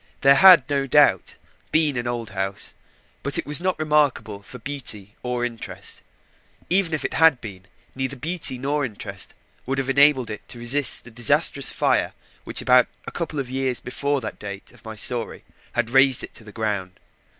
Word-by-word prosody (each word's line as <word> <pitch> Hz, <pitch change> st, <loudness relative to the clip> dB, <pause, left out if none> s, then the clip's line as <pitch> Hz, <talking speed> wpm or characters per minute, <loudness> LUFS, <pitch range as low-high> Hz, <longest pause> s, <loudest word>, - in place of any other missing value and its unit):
There 135 Hz, -, +6 dB
had, 175 Hz, -2 st, +7 dB
no 140 Hz, -1 st, -1 dB
doubt, 130 Hz, -9 st, +2 dB, 0.3 s
been 155 Hz, -3 st, +2 dB
an 120 Hz, -1 st, -3 dB
old 120 Hz, -2 st, -5 dB
house; 95 Hz, 0 st, -2 dB, 0.5 s
but 140 Hz, -, +5 dB
it -, -, -3 dB
was 150 Hz, +3 st, +5 dB
not 185 Hz, -1 st, -1 dB
remarkable 150 Hz, -9 st, 0 dB
for 125 Hz, -, -11 dB
beauty 115 Hz, -6 st, -4 dB
or 125 Hz, -1 st, -3 dB
interest. 120 Hz, -2 st, -5 dB, 0.7 s
Even 175 Hz, -4 st, +3 dB
had 160 Hz, -1 st, +4 dB
it 125 Hz, -, -25 dB
been, 95 Hz, -4 st, -10 dB, 0.3 s
neither 130 Hz, +1 st, -4 dB
beauty 155 Hz, -1 st, +1 dB
nor 145 Hz, +3 st, -2 dB
interest 110 Hz, -6 st, -5 dB, 0.3 s
would 135 Hz, +1 st, -2 dB
have 135 Hz, 0 st, -1 dB
enabled 140 Hz, -4 st, +3 dB
it 105 Hz, -, -9 dB
to -, -, -6 dB
resist 125 Hz, +4 st, +3 dB
the 120 Hz, -, -13 dB
disastrous 115 Hz, 0 st, +3 dB
fire -, -, 0 dB, 0.3 s
which -, -, -3 dB
about 125 Hz, -1 st, +4 dB, 0.2 s
a -, -, -7 dB
couple 165 Hz, -3 st, -5 dB
of 135 Hz, -2 st, -3 dB
years 130 Hz, -2 st, -1 dB
before 140 Hz, +2 st, -3 dB
the 110 Hz, -, -5 dB
date 100 Hz, -1 st, -10 dB
of -, -, -21 dB
my 110 Hz, -1 st, -9 dB
story 115 Hz, +2 st, 0 dB, 0.3 s
had 120 Hz, -1 st, -2 dB
razed 135 Hz, -1 st, +4 dB
it -, -, -9 dB
to -, -, -11 dB
the 105 Hz, -, -13 dB
ground. 100 Hz, -4 st, -4 dB
130 Hz, 180 wpm, -22 LUFS, 115-145 Hz, 0.7 s, had